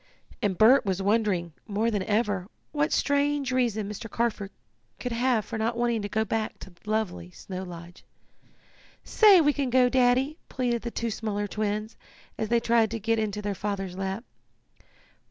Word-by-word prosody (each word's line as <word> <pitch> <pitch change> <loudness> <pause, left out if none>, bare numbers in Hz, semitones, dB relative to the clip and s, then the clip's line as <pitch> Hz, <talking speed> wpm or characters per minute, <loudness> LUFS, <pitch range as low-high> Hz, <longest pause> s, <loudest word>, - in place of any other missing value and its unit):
And 200 -5 0
Bert 240 +6 +6
was 190 -2 -1
wondering, 195 -5 +1
more 220 +2 0
than 205 -3 0
ever, 205 -2 0 0.2
what 295 0 0
strange 285 -1 +1
reason 235 -5 0
Mr. 210 +2 -7
Carford 220 -3 -1 0.5
could 250 - -4
have 235 -2 +1
for 225 - -5
not 230 +2 -1
wanting 235 -2 +1
to 205 - -4
go 220 +2 0
back 220 -1 -2
to 190 - -11
lovely 210 - -2
Snow 185 - -7
Lodge. 175 -1 -10 1.0
"Say 415 -4 +6
we 295 -1 +3
can 275 -3 -1
go, 250 0 +4
Daddy!" 260 +4 +2
pleaded 240 -3 -1
the 235 - -4
two 230 0 -3
smaller 205 -1 -2
twins, 215 +1 -3 0.4
as 220 - -3
they 235 - +3
tried 230 -1 +3
to 225 +1 -4
get 225 +2 0
into 210 -1 -2
their 205 0 -1
father's 195 -2 -4
lap. 195 +3 -3
220 Hz, 170 wpm, -27 LUFS, 205-240 Hz, 1.0 s, Bert